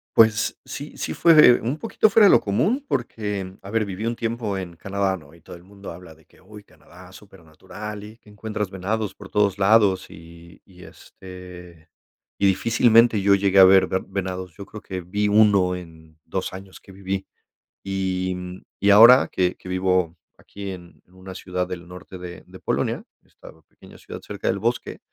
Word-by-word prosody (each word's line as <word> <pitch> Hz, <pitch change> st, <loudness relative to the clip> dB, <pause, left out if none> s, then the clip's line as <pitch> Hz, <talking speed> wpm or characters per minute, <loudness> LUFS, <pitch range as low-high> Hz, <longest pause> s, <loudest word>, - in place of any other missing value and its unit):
Pues 110 Hz, -1 st, +3 dB
sí 145 Hz, +2 st, -8 dB
sí -, -, -4 dB
fue 155 Hz, -7 st, +6 dB
un 125 Hz, +6 st, -3 dB
poquito 220 Hz, +3 st, +1 dB
fuera 210 Hz, +1 st, +5 dB
de 195 Hz, -, +7 dB
lo -, -, +5 dB
común 205 Hz, -, 0 dB
porque, 105 Hz, -5 st, -4 dB
a 95 Hz, -, -11 dB
ver, 110 Hz, 0 st, 0 dB
viví 100 Hz, +3 st, -6 dB
un 120 Hz, -, -2 dB
tiempo 115 Hz, -3 st, -3 dB
en 90 Hz, -3 st, -7 dB
Canadá, 100 Hz, +2 st, -2 dB
¿no? 80 Hz, -2 st, -15 dB
Y 85 Hz, -, -21 dB
todo 85 Hz, -, -12 dB
el 85 Hz, -, -15 dB
mundo 100 Hz, +1 st, -11 dB
habla 85 Hz, -1 st, -12 dB
de 80 Hz, 0 st, -25 dB
que, -, -, -25 dB
uy, 105 Hz, +2 st, -14 dB
Canadá, 90 Hz, -2 st, -18 dB
super 95 Hz, -3 st, -16 dB
natural 105 Hz, +6 st, -9 dB
y 110 Hz, +2 st, -12 dB
que 105 Hz, -, -22 dB
encuentras 105 Hz, -1 st, -5 dB
venados 105 Hz, +2 st, -3 dB
por -, -, -13 dB
todos 100 Hz, -2 st, +1 dB
lados 100 Hz, -2 st, +3 dB
y 85 Hz, +1 st, -15 dB
y 90 Hz, -2 st, -17 dB
este 90 Hz, -3 st, -13 dB, 0.5 s
y 100 Hz, -, +3 dB
difícilmente 115 Hz, +2 st, +3 dB
yo 100 Hz, 0 st, +4 dB
llegué 100 Hz, 0 st, +2 dB
a -, -, +10 dB
ver 95 Hz, 0 st, +6 dB
ve 95 Hz, -, -1 dB
venados. 95 Hz, -2 st, -5 dB
Yo 100 Hz, -, -9 dB
creo 105 Hz, +1 st, -11 dB
que 95 Hz, -1 st, -6 dB
vi 100 Hz, +4 st, -2 dB
1 100 Hz, -3 st, +3 dB
en 80 Hz, -3 st, -13 dB
2 -, -, -4 dB
años 95 Hz, 0 st, -11 dB
que 100 Hz, -, -17 dB
viví. 95 Hz, 0 st, -5 dB, 0.6 s
Y 95 Hz, -1 st, -3 dB, 0.2 s
y 100 Hz, -, +2 dB
ahora 115 Hz, +6 st, +8 dB
que 90 Hz, -1 st, 0 dB
que -, -, -14 dB
vivo 90 Hz, -2 st, 0 dB, 0.2 s
aquí 100 Hz, -1 st, -9 dB
en 90 Hz, -2 st, -12 dB
en 90 Hz, -, -28 dB
una 95 Hz, 0 st, -11 dB
ciudad 90 Hz, -1 st, -4 dB
del 90 Hz, -2 st, -8 dB
norte 90 Hz, +1 st, -11 dB
de 90 Hz, -1 st, -10 dB
de -, -, -13 dB
Polonia, -, -, -2 dB, 0.2 s
esta -, -, -16 dB, 0.2 s
pequeña -, -, -17 dB
ciudad -, -, -10 dB
cerca -, -, -7 dB
del 100 Hz, -, 0 dB
bosque, 120 Hz, +4 st, -3 dB
95 Hz, 190 wpm, -22 LUFS, 90-105 Hz, 0.6 s, a